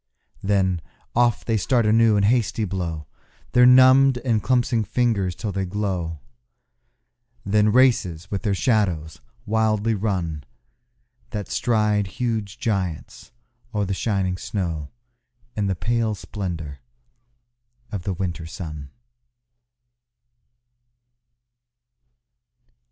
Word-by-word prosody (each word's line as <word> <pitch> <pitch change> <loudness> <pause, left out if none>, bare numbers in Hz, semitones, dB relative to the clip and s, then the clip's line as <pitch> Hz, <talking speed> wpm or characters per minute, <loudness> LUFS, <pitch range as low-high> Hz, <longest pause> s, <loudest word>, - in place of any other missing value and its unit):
Then 95 -3 +1 0.3
off 120 -1 +2
they 115 -1 +1
start 120 +2 +1
anew 110 0 +4
and 100 -1 +3
hasty 110 -1 +1
blow 85 -5 -4 0.5
Their 125 0 +6
numbed 130 +1 +7
and 115 -4 +2
clumpsing 120 -2 +1
fingers 105 -5 0
till 105 - -4
they 95 0 -2
glow; 90 -4 -2 1.3
Then 105 +1 +3
races 105 -9 +2
with 100 - -2
their 105 -4 0
shadows 95 -9 0 0.2
wildly 110 0 +1
run 90 -8 -2 0.9
That 105 -3 -5
stride 105 -3 +1
huge 110 -2 -3
giants 95 -8 -3 0.4
o'er 105 -1 +1
the 95 - -2
shining 95 -3 -1
snow 85 -8 -3 0.7
In 105 -2 0
the 95 - 0
pale 115 +2 0
splendour 85 -8 -6 1.1
of 100 - -3
the 95 +2 -2
winter 85 -2 -4
sun. 75 -5 -7
100 Hz, 100 wpm, -23 LUFS, 90-115 Hz, 1.3 s, numbed